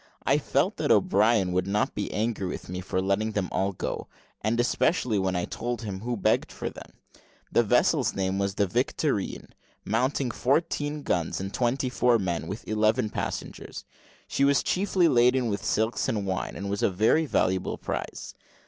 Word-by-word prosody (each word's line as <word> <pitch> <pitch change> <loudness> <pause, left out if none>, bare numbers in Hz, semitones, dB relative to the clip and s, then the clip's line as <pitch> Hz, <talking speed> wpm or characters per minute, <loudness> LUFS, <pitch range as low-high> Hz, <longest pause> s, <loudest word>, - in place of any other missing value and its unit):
I - - +3
felt - - 0
that - - -1
O'Brien 105 -2 +3
would 90 +1 0
not 105 +2 0
be 100 - -3
angry 105 -3 -1
with - - -6
me 90 0 -4
for 95 0 -2
letting 100 +3 0
them 100 -3 -1
all 95 +1 0
go; 90 - -4 0.3
and 110 +3 0
especially 120 - +1
when 95 -1 0
I 90 -1 0
told 120 -1 -4
him 100 -3 -4
who 120 +3 -3
begged 100 - +1
for - - -5
them. - - -12 0.6
The - - +4
vessel's - - +2
name 95 0 -1
was 100 -1 -1
the 100 - +2
Victorine, 90 - -1 0.4
mounting 125 +3 0
fourteen 145 +3 0
guns, 85 -9 -1
and 95 +1 -5
twenty 130 +2 0
four 125 -1 +3
men, 90 -5 -2
with 100 +5 -6
eleven 110 +1 +1
passengers. - - -5 0.4
She 140 - 0
was 140 0 +4
chiefly 185 -2 +2
laden 125 -2 +3
with 100 - -3
silks 110 +2 0
and 105 -3 -1
wine, 95 -1 -3
and 100 - -5
was 100 0 -2
a - - +3
very 110 - +2
valuable 95 -7 0
prize. - - -5
110 Hz, 175 wpm, -27 LUFS, 95-125 Hz, 0.6 s, The